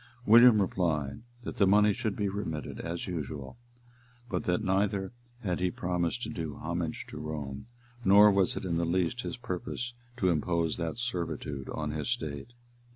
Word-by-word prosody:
William 115 0 +8
replied, 80 -8 0 0.2
that - - -6
the 100 - +5
money 105 +1 +5
should 110 -2 -2
be 105 - 0
remitted 95 -6 -4
as 85 +1 -4
usual; 75 - -5 0.7
but 90 - -2
that 90 +5 +1
neither 95 +1 0 0.3
had 90 -6 -1
he 90 0 +2
promised 90 +5 -1
to - - -3
do 80 -8 -4
homage 85 0 -3
to - - -8
Rome, 75 +2 -5 0.4
nor 105 +1 +8
was 95 -2 +2
it - - -4
in 85 -2 0
the 85 - +1
least 90 +7 0
his 125 - -5
purpose 120 +3 -4 0.2
to 95 -6 +2
impose 85 0 0
that 85 +3 -3
servitude 85 - -3
on 75 -1 -3
his 75 +5 -3
state. 80 - -3
90 Hz, 165 wpm, -30 LUFS, 80-105 Hz, 0.7 s, William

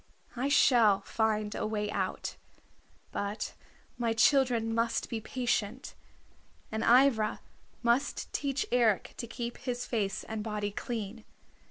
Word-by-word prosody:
I 260 +3 0
shall 230 -8 +5
find 215 0 0
a - - -2
way 210 -1 -2
out. - - -2 0.8
But 200 +2 -3 0.5
my 230 -1 +1
children 235 -2 +3
must 230 0 0
be 225 -2 -2
patient, 240 0 -2 0.8
and 220 0 -2
Ivra 240 -3 +4 0.4
must 240 +4 +1
teach 280 -1 -1
Eric 235 -5 +2
to 235 - -5
keep 240 0 -5
his 245 -2 -3
face 200 -5 -1
and 220 -1 -4
body 210 -2 -2
clean. 220 0 -5
230 Hz, 125 wpm, -30 LUFS, 215-245 Hz, 0.8 s, shall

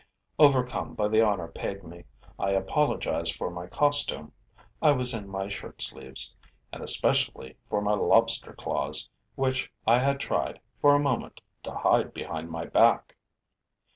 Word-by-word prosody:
Overcome 130 -4 +3
by 105 -1 0
the 110 +1 +4
honor 100 -6 0
paid 100 +3 -6
me, 85 +1 -12 0.3
I 100 - 0
apologized 95 - 0
for - - -4
my 85 0 -7
costume 145 - +1 0.5
I 150 - +6
was 125 -2 +2
in 105 -3 -6
my 95 0 -4
shirt 100 -1 -8
sleeves 65 0 -3 0.4
and - - -7
especially 65 - +1
for 105 - 0
my 105 0 +1
lobster 105 - +2
claws, - - -2 0.3
which 130 0 -1
I 115 +2 +5
had 140 +1 +1
tried, - - -2 0.2
for 145 0 +6
a - - +4
moment, 140 -4 -2 0.3
to - - -5
hide - - +2
behind 80 +1 -5
my 80 0 -5
back. - - +3
105 Hz, 150 wpm, -27 LUFS, 90-135 Hz, 0.5 s, I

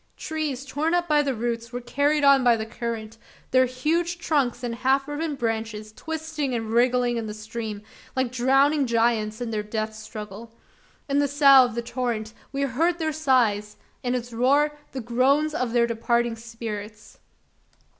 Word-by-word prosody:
Trees 300 -4 -3
torn 305 +5 0
up 350 0 0
by 300 -2 +4
the 275 -3 -1
roots 230 0 -3
were 245 - -4
carried 285 +5 +1
on 275 -2 +6
by 240 -2 +5
the 220 - -3
current 225 -1 -5 0.3
their 255 0 +5
huge 330 +8 -1
trunks 270 -8 0
and 240 -1 -2
half 265 +3 +1
riven 295 +1 -3
branches 220 -3 -3
twisting 310 0 -4
and 225 -2 -3
wriggling 245 0 +2
in 225 -1 -3
the 210 - -6
stream, 215 -1 -6 0.3
like 260 -2 0
drowning 270 +3 +3
giants 225 -1 +1
in 235 -2 -3
their 215 -1 -1
death 215 +1 -3
struggle. 215 +1 -9 0.5
In 280 0 +1
the 285 - +3
"sough" 275 -2 +7
of 240 -3 -5
the 235 - -2
torrent, 235 -3 -3 0.2
we 275 0 -1
heard 320 +7 +1
their 315 -2 -1
sighs 235 -8 +1 0.2
in 250 0 -1
its 240 -1 -4
roar, 285 +5 +3 0.2
the 265 - -5
groans 270 +6 +2
of 255 -7 -1
their 235 0 +3
departing 235 0 0
spirits! 220 -2 -8
245 Hz, 170 wpm, -25 LUFS, 225-280 Hz, 0.5 s, sough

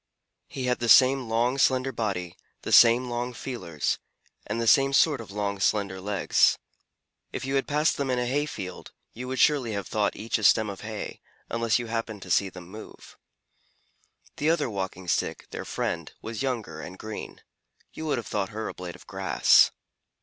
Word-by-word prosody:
He 130 - -5
had 125 0 0
the 120 -1 -1
same 130 -1 +6
long, 120 +4 +1
slender 130 0 +3
body, 95 -8 -3 0.3
the - - -4
same 120 +2 +7
long 120 +1 -3
feelers, 110 - -3 0.5
and 115 - -2
the 115 - -1
same 135 +5 +5
sort 145 -2 +4
of 110 - -11
long, 100 0 -3
slender 95 -1 0
legs. 100 -1 +2 0.7
If - - -5
you 135 - -3
had 135 -1 +1
passed 150 +2 +1
them 140 -2 -2
in 125 - +1
a 125 - 0
hay 145 +4 0
field, 95 -9 -7 0.2
you 125 +2 -7
would 130 +1 -3
surely 135 -7 +3
have 100 -1 -4
thought 105 -2 0
each 110 +1 -2
a - - -6
stem 110 0 +4
of 100 - -10
hay, 110 -1 -6 0.3
unless 115 -1 +1
you 120 - -4
happened 115 -3 -4
to 90 - -7
see 100 +2 +3
them 90 -2 -11
move. 105 +4 -12 1.2
The 150 - +1
other 165 -7 +1
Walking 95 -2 -5
Stick, 85 - -1
their - - -6
friend, - - -3
was 115 +1 -6
younger 115 - -3
and 90 +6 -9
green. 110 +1 -7 0.5
You 160 - -6
would 145 - +1
have 120 - -4
thought 100 -1 -2
her 110 0 -5
a - - -5
blade 90 -1 -8
of - - -16
grass. - - +4
115 Hz, 190 wpm, -26 LUFS, 100-130 Hz, 1.2 s, same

